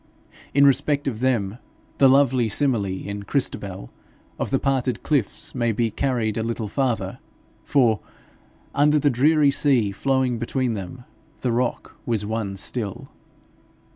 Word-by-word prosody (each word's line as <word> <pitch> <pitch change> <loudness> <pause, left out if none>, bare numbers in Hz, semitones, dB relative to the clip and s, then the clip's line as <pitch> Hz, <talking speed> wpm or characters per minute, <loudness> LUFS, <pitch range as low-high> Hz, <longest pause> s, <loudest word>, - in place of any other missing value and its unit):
In 140 0 +6
respect 140 +1 +2
of 115 -5 -2
them, 115 -4 0 0.4
the 135 - +7
lovely 130 -4 +3
simile, 120 -4 +1 0.2
in 100 0 -5
Christabel, 100 - -2 0.5
of - - -2
the 135 - +2
parted 130 -2 -1
cliffs, 140 -9 0
may 120 -2 0
be 115 +1 0
carried 120 -3 -1
a - - 0
little 115 -1 -3
farther, 125 -1 -2 0.4
for, 120 -8 +2 0.7
under 150 +1 +3
the 145 -1 +2
dreary 145 +3 +4
sea 135 -7 +2
flowing 130 +2 0
between 125 +1 -1
them, 105 +5 -7 0.4
the 125 - 0
rock 120 +1 -2
was 110 -4 0
one 105 -2 -3
still. 100 +1 -3
125 Hz, 140 wpm, -23 LUFS, 110-135 Hz, 0.7 s, the